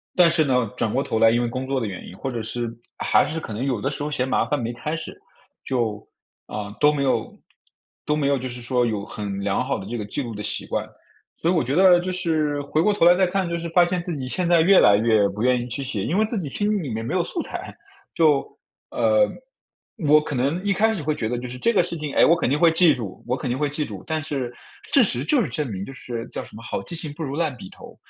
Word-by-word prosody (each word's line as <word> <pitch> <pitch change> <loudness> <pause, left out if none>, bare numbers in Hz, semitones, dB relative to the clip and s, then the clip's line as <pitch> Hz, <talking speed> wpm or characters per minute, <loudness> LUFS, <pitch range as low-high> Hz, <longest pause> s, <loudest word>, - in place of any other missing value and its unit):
但 175 -2 +6
是 165 -1 +3
呢， 125 -5 +1
转 110 - 0
过 135 - +1
头 110 - -1
来 115 - +6
因 120 +1 +2
为 120 - 0
工 130 +3 -4
作 135 -1 0
的 115 - -2
原 95 -3 -7
因， 95 - -11
或 135 - -4
者 115 -2 -3
是 115 +1 -3 0.3
还 - - +3
是 160 +1 -3
可 110 - -7
能 115 +5 -3
有 130 -5 0
的 135 - 0
时 145 +1 -4
候 150 - -2
嫌 130 -3 -1
麻 - - +2
烦 145 +4 -1
没 115 +1 -3
开 150 +7 -3
始， 165 - -8 0.4
就， 115 -5 -2 0.4
呃， 105 0 -6
都 150 0 +5
没 140 -2 -1
有 130 - -1 0.7
都 150 - +1
没 145 -2 0
有 140 - +3
就 130 0 -5
是 120 0 -8
说 125 0 +1
有 105 -3 -2
很 100 -2 -5
良 100 +4 0
好 135 - -1
的 95 - -8
这 120 - -4
个 105 - -3
记 140 +7 -3
录 115 -2 -6
的 105 - -6
习 105 - -2
惯。 - - -3 0.6
所 170 - +3
以 - - +2
我 160 - +2
觉 135 +4 -1
得 180 -1 +7
就 185 +1 -3
是 155 -5 0
回 155 +2 0
过 210 - +3
头 185 -4 +2
来 175 - +8
再 185 0 +3
看 190 0 -1
就 170 - -2
是 170 0 -5
发 175 +1 +5
现 180 0 -1
自 170 -5 -4
己 130 -1 -5
现 175 +5 -1
在 170 - +5
越 190 +3 +6
来 100 0 +6
越 110 -2 +3
不 105 +3 -4
愿 125 -1 +3
意 120 - -5
去 125 +3 -4
写， 110 -7 -3
因 175 - -1
为 220 - +4
自 220 -2 -3
己 150 - -4
心 205 +5 0
里 140 - -5
面 115 0 -4
没 120 - -3
有 180 - +2
素 335 - -3
材， - - -7 0.4
就， 150 -4 +4 0.5
呃， - - +3 0.8
我 150 +1 +7
可 150 -1 -4
能 140 +9 0
一 200 - +2
开 220 +3 +3
始 170 -9 -4
会 155 +1 0
觉 110 -5 -2
得 120 - -1
就 125 - -6
是 125 - -7
这 235 - +3
个 205 - +4
事 - - -4
情， 150 -2 -4
哎， - - +6
我 170 - +5
肯 165 - 0
定 145 - +2
会 170 0 +6
记 165 0 +5
住 105 -6 -7
我 125 - 0
肯 130 - -4
定 125 - -1
会 145 +1 0
记 150 +1 -2
住， 100 -6 -8
但 160 0 -1
是 135 -5 -3 0.4
事 275 - +6
实 130 - -1
就 265 - +2
是 170 - -2
证 135 +1 -2
明 95 0 -4
就 135 - -9
是 120 -3 -6
叫 - - -4
什 - - -14
么 115 - -10
好 - - -3
记 170 - -8
性 155 -3 -6
不 160 - -6
如 140 -1 -4
烂 155 -4 -1
笔 95 - -10
头， - - -13
140 Hz, 310 characters per minute, -23 LUFS, 120-170 Hz, 0.8 s, 来